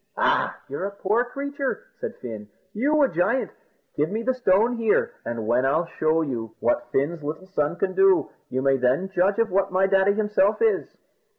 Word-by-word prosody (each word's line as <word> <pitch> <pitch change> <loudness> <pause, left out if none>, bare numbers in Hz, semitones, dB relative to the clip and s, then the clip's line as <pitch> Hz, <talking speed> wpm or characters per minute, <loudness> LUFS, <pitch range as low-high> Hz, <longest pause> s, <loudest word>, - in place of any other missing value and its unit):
"Ah, - - +1
you're 145 +7 -4
a 200 - -9
poor 210 +5 +1
creature!" 280 - -4 0.2
said - - -5
Fin. 110 -4 -8 0.2
"You 290 +7 +2
a - - +5
giant! 230 +7 0 0.4
Give 150 +2 0
me 220 +4 -3
the 260 +2 +1
stone 235 -1 +2
here, 225 -2 +1
and 115 -2 -4
when 120 +3 +2
I'll 155 +6 +2
show 160 0 0 0.4
what 300 0 0
Fin's 155 +5 0
little 155 +5 -5
son 160 -4 -1
can 185 +1 -1
do, 195 0 +3 0.2
you 130 +1 -2
may 135 0 +3
then 130 +9 +1
judge 190 +3 +2
of 230 -3 +1
what 195 +1 +1
my 185 +1 +3
daddy 195 +1 +3
himself 210 -1 +1
is." 450 -2 0
190 Hz, 185 wpm, -24 LUFS, 155-230 Hz, 0.4 s, a